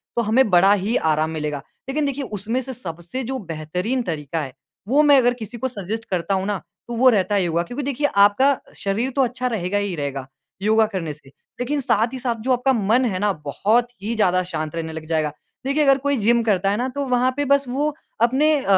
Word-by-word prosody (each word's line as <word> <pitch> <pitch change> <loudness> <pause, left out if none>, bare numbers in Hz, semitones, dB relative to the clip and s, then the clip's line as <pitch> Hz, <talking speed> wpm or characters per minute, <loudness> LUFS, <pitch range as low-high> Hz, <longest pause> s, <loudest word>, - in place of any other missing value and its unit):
तो 235 - +2
हमें 225 +2 +3
बड़ा 190 +3 +6
ही 205 +4 0
आराम 155 +1 +1
मिलेगा। 150 -3 -3 0.3
लेकिन 295 +2 0
देखिए, 280 0 -2
उसमें 225 +3 -3
से 260 +1 -7
सबसे 175 +3 -6
जो 265 +3 -3
बेहतरीन 180 +11 -2
तरीका 160 -3 -3
है, 135 -3 -6 0.3
वो 285 +5 +4
मैं 290 -2 +7
अगर 245 -1 +4
किसी 235 0 -8
को 260 - -1
सजेस्ट 220 -1 -5
करता 185 +1 -1
हूँ 190 0 -1
ना, 205 -2 0 0.3
तो 240 - -5
वो 255 +1 +6
रहता 205 -2 +2
है 195 - +3
योगा 170 -1 0
क्योंकि 245 +10 -5
देखिए 285 +2 0
आपका 260 +8 +5 0.2
शरीर 210 +6 -1
तो 275 - +3
अच्छा 250 +1 -2
रहेगा 205 -4 -1
ही 205 -3 -1
रहेगा, 140 -3 -4 0.3
योगा 220 +1 +4
करने 165 -5 -3
से। 145 -2 -18 0.3
लेकिन 280 +4 -1
साथ 230 -1 +1
ही 260 - -4
साथ 240 -2 -1
जो - - +3
आपका 255 +2 +2
मन 230 +3 +2
है 190 -6 -1
ना 210 0 +2
बहुत 220 - +2 0.2
ही 225 +3 -2
ज़्यादा 185 -4 +3
शाँत 155 -3 -4
रहने 160 -1 -4
लग 160 0 -7
जाएगा। 155 -2 0 0.3
देखिए, 285 +3 +2
अगर 275 -1 +5
कोई 280 +1 0
जिम 235 +2 +3
करता 195 -3 +2
है 205 - 0
ना 250 +3 -1
तो 280 - -1
वहाँ 250 +1 +2
पे 290 - 0
बस 280 0 +3
वो 290 +4 0 0.3
अपने 265 +6 +4
अ, - - -6
220 Hz, 225 wpm, -22 LUFS, 180-260 Hz, 0.3 s, मैं